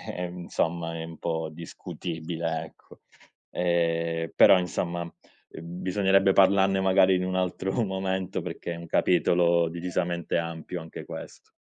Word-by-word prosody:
eh, 90 0 -3
insomma, 85 -1 -2
è - - -4
un 80 0 -10
po' 80 -1 -2
discutibile 80 0 -5
ecco, - - -18 0.5
ehm, 85 -2 0
però, 95 - +7
insomma, 85 -1 -3 0.5
bisognerebbe 95 +3 +2
parlarne 95 0 +4
magari 95 0 +5
in 90 - 0
un 95 0 -2
altro 95 +1 -1
momento, 95 -1 -2
perché 85 - -5
è - - -6
un 85 0 -9
capitolo 85 0 +3
decisamente 85 0 -2
ampio 85 +1 -4
anche 80 - -9
questo. - - -10
85 Hz, 130 wpm, -27 LUFS, 85-95 Hz, 0.5 s, però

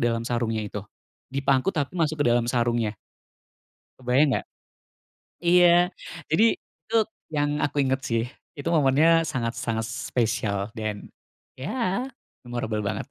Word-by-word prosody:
dalam 115 -1 +1
sarungnya 115 -2 -1
itu, 105 0 -5 0.5
dipangku 135 +4 +2
tapi 145 +3 -2
masuk 155 -2 +1
ke - - +1
dalam 120 0 +2
sarungnya. 120 -3 +1 1.1
Kebayang 130 +4 +3
nggak? - - -1 1.0
Iya, 175 0 +5 0.4
jadi 170 +9 +4
itu 225 - -9 0.4
yang 145 0 +1
aku 145 - -1
inget 130 0 +1
sih. 115 -1 +1 0.3
Itu 145 - -5
momennya 155 +3 +5
sangat-sangat 115 -4 -2
spesial 115 -5 -1
dan, 110 -2 -4 0.5
ya 230 - -1 0.4
memorable 110 -3 -3
banget. 100 - -3
130 Hz, 120 wpm, -25 LUFS, 115-155 Hz, 1.1 s, Iya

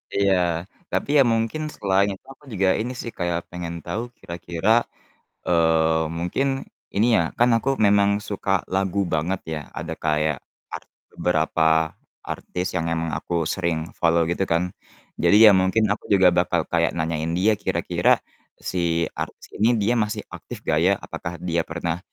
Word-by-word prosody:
Iya, 90 -3 +1 0.2
tapi - - -1
ya 135 - +7
mungkin 115 +7 -1
selain 100 0 +2
itu 95 - -14
aku 140 - -29
juga 95 -1 +1
ini 120 +3 -2
sih 115 - -6
kayak 85 -1 0
pengen 85 -1 -5
tahu 85 +7 -3 0.2
kira-kira, 85 +2 -4 0.8
eee, 80 -1 +3
mungkin 90 +11 -1 0.5
ini 105 +4 +3
ya, - - +3 0.2
kan 120 +1 +5
aku 130 - -2 0.2
memang 100 0 +4 0.2
suka 100 -1 -4 0.2
lagu 95 0 0
banget 85 +5 0
ya, 75 - -4 0.2
ada 80 +1 -5
kayak 75 -2 +1 0.3
art - - -7 0.3
beberapa 80 -1 +1 0.6
artis 90 0 -4
yang 85 - -1
emang 80 0 -2
aku 85 - -5 0.2
sering 85 -3 -2
follow 85 0 +3
gitu 90 - -1
kan. 85 +1 +3 0.6
Jadi 100 - +4
ya 110 - +10
mungkin 100 +4 +2
aku 105 - -6
juga 95 -2 +6
bakal 90 -1 +2
kayak 85 -1 +2
nanyain 80 0 -2
dia, 105 +4 +4
kira-kira 100 - 0 0.6
si 85 -2 0
artis - - -6
ini 110 +3 +3
dia 115 +4 +2
masih 105 0 -1
aktif - - -9
nggak 75 - +1
ya? 95 - +5
Apakah 85 - -6
dia 85 -2 -1
pernah 85 0 -3
90 Hz, 155 wpm, -23 LUFS, 85-100 Hz, 0.8 s, ya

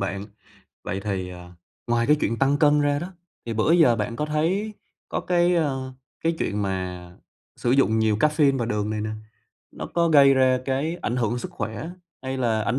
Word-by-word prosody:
bạn? 100 +1 -3 0.6
Vậy 95 - -3
thì, 95 -3 -3
ờ, 90 0 -11 0.4
ngoài 120 0 +1
cái 150 - +5
chuyện 115 - 0
tăng 140 +1 +3
cân 150 -1 +4
ra 145 0 +1
đó, 175 +5 -6 0.3
thì 115 - -3
bữa 110 +8 +2
giờ 160 -9 +5
bạn 115 +2 -3
có 150 - -1
thấy 170 +8 0 0.4
có - - -2
cái, 175 0 +2
ờ, 135 -5 -1 0.3
cái 165 0 0
chuyện 105 0 -1
mà 90 -2 -4 0.5
sử 120 - -1
dụng 125 -4 +3
nhiều 110 -1 +2
caffeine 150 +1 +3
và 115 - -1
đường 105 -2 -1
này 110 - -2
nè, 110 0 -3 0.6
nó - - -6
có 170 -1 +3
gây 140 -3 +6
ra 130 -1 +3
cái 140 +6 -1
ảnh 120 - -1
hưởng 120 -1 0
sức - - -6
khỏe, 110 +9 -5 0.3
hay 130 0 -3
là 115 -3 +1
ảnh 115 +5 0
130 Hz, 200 wpm, -24 LUFS, 105-150 Hz, 0.6 s, gây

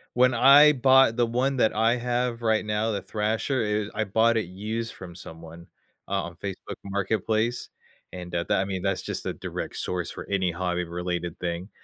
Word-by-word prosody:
When 125 +1 +4
I 140 +5 +8
bought 130 -3 +5
the 120 0 +2
one 130 +4 0
that 110 -4 +2
I 115 +3 +3
have 120 0 -1
right 110 -2 +1
now, 105 +1 0
the 100 -2 -2
thrasher, 110 +6 -1
it 105 0 -1
I 110 - 0
bought 115 +3 +2
it 110 - -1
used 110 +5 -4
from 90 -2 -10
someone 80 0 -11 0.4
uh, 95 0 -1
on 85 0 -8
Facebook 95 +1 -6
Marketplace, 110 +4 -1 0.4
and, 90 -1 -7
that 85 0 -2
that - - +2
I - - -1
mean, 95 -2 -4
that's 95 -1 -1
just - - -4
a - - -2
direct - - -6
source 90 -1 -2
for - - -8
any 95 -3 +1
hobby-related 90 -1 -3
thing. 90 +2 -4
105 Hz, 190 wpm, -26 LUFS, 90-115 Hz, 0.4 s, I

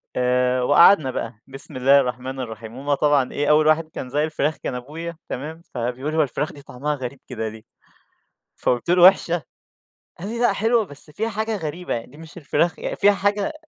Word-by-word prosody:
آآ 125 0 +2
وقعدنا 145 +1 +6
بقى، 115 -1 -4
بسم 135 +1 -6
الله 135 +2 +5
الرحمن 130 +1 -3
الرحيم. 115 -1 -7
هُم 145 +2 -1
طبعًا 145 -2 +2
إيه، 145 +1 -1
أول 155 0 +5
واحد 155 0 +3
كان 130 - -7
ذاق 145 +4 0
الفراخ 155 -1 -1
كان - - -4
أبويا، 160 +6 -7
تمام؟ 155 +5 -6
فبيقول: 125 +5 -3
"هي 155 - +4
الفراخ 145 +3 -3
دي 145 - -12
طعمها 145 +3 -3
غريب 130 0 -6
كده 110 -3 -4
ليه؟" 110 0 -11 0.9
فقُلت 125 +7 -1
له: 175 0 +4
"وحشة؟" 175 -4 +5 0.8
قال 195 - -5
لي: 235 +1 -4
"لأ، 240 -5 +3
حلوة، 225 +1 +2
بس 145 0 -8
فيها 220 +7 -2
حاجة 220 +1 -2
غريبة 165 +2 -4
يعني، 115 - -4
دي 145 - -15
مش 165 +2 -12
الفراخ 160 +2 0
ي - - -3
فيها 205 +1 +5
حاجة 205 +5 0
145 Hz, 195 wpm, -22 LUFS, 125-170 Hz, 0.9 s, وقعدنا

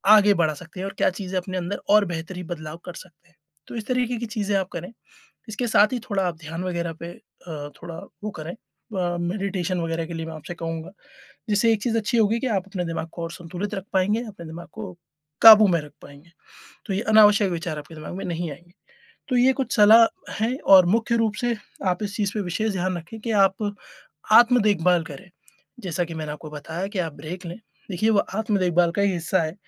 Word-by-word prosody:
आगे 205 -1 +6
बढ़ा 160 -2 +2
सकते 170 +4 -11
हैं 190 - -3
और - - -7
क्या - - +3
चीज़ें 185 0 -5
अपने 185 +1 -5
अंदर 180 +3 -3
और 210 0 +6
बेहतरी 175 +1 -5
बदलाव 155 -2 -6
कर 180 - -7
सकते 175 -3 -14
हैं। 175 - -31 0.3
तो - - -8
इस 225 -2 -5
तरीके 250 -1 0
की 235 - -3
चीज़ें 210 -3 -2
आप 190 -2 -1
करें। 175 +4 -6 0.6
इसके 240 +3 -2
साथ 215 0 +4
ही 245 - -1
थोड़ा, 205 -5 -2
आप 170 -2 -4
ध्यान 165 +2 -6
वगैरह 170 -2 -2
पे 170 - -5 0.4
अ, 145 -3 -6
थोड़ा 170 -1 -7 0.3
वो 215 - -2
करें 155 +2 -5
अ, 180 -6 -5
मेडिटेशन 185 0 -2
वगैरह 165 0 -2
के 170 - -7
लिए 165 -1 -4
मैं 165 - -6
आपसे 155 +2 -8
कहूँगा। 165 +1 -5 0.6
जिससे 210 +3 +3
एक 210 - -2
चीज़ 230 -2 +1
अच्छी 225 +2 0
होगी 225 +1 +3
कि 260 - -2
आप 195 -5 0
अपने 185 -3 -3
दिमाग 165 0 -4
को 170 - -6
और 165 - -4
संतुलित 175 +5 -6
रख 190 - -5
पाएँगे, 200 +4 +2
अपने 195 -5 -10
दिमाग 170 +2 -9
को 210 -4 -7 0.5
काबू 220 -2 +10
में 170 -3 +2
रख 150 -1 -12
पाएँगे। 145 +4 -15 0.6
तो 200 - -3
ये, 195 - 0
अनावश्यक 210 -2 +5
विचार 165 -2 -3
आपके 150 +2 -10
दिमाग 155 +2 -7
में 195 - -5
नहीं 170 -1 -3
आएँगे। 175 +5 -15 0.6
तो 255 - +1
ये 255 +2 +5
कुछ 265 -1 -2
सलाह 220 +2 +8 0.4
हैं 245 +4 0 0.2
और 185 -2 +8
मुख्य 230 +1 +1
रूप 225 -2 +1
से, 240 -1 +1 0.3
आप 180 +2 0
इस 205 0 -5
चीज़ 205 -2 -1
पे 215 - -1
विशेष 200 +4 -1
ध्यान 185 0 -1
रखें 170 +7 -10
कि 230 - -4 0.2
आप 205 +2 -3 0.6
आत्म-देखभाल 210 -7 +5
करें। 165 +4 -11 0.5
जैसा 180 -3 -2
कि 165 -1 -8
मैंने 155 -2 -4
आपको 150 +1 -9
बताया 160 +5 -5
कि 190 - -2
आप 165 -4 -1
ब्रेक 175 +5 -8
लें, 170 +4 -7 0.3
देखिए 205 +5 +1
वो 210 - +3 0.2
आत्म-देखभाल 185 -5 +2
का 200 - +2
ही 200 -1 +2
हिस्सा 175 +2 0
है, 155 0 -3
185 Hz, 220 wpm, -24 LUFS, 170-210 Hz, 0.6 s, काबू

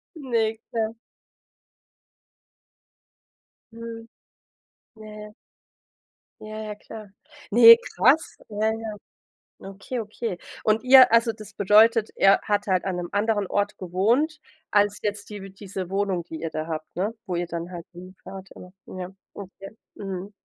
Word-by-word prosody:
Ne, 230 -6 -1
klar. 225 0 -2 2.8
Mhm. 230 0 -9 0.9
Ne. 215 -1 -11 1.1
Ja, 215 0 -7
ja, 215 -1 -6
klar. 215 0 -11 0.4
Ne, 230 +1 +10 0.2
krass. 285 +6 +3
Ja, 210 +1 -1
ja. 220 -1 -4 0.8
Okay, 200 +6 -6
okay. 215 -2 -5 0.3
Und 220 +2 +2
ihr 255 -1 +8
also 230 0 +4
das 215 -2 -13
bedeutet, 215 +3 +4
er 195 0 +5
hat 205 -1 -1
halt 185 -2 +1
an 190 -2 -2
'nem 175 -1 -4
anderen 205 -1 0
Ort 205 +2 -1
gewohnt 230 - 0 0.3
als 205 0 +2
jetzt 210 0 -4
die 200 -2 -8
diese 190 -2 -7
Wohnung, 195 -2 -1
die 160 -1 -8
ihr 165 - -4
da 155 0 -4
habt, 155 -1 -6
ne? 200 +5 -2
Wo 180 - -4
ihr 175 0 -1
dann 170 +1 -6
halt 170 -2 -8
hinfahrt, 185 +2 -11
äh. 180 - -11 0.3
Ja, 180 0 -5 0.2
okay, 195 0 -10 0.2
mhm. 195 0 -6
205 Hz, 130 wpm, -24 LUFS, 190-225 Hz, 2.8 s, Ne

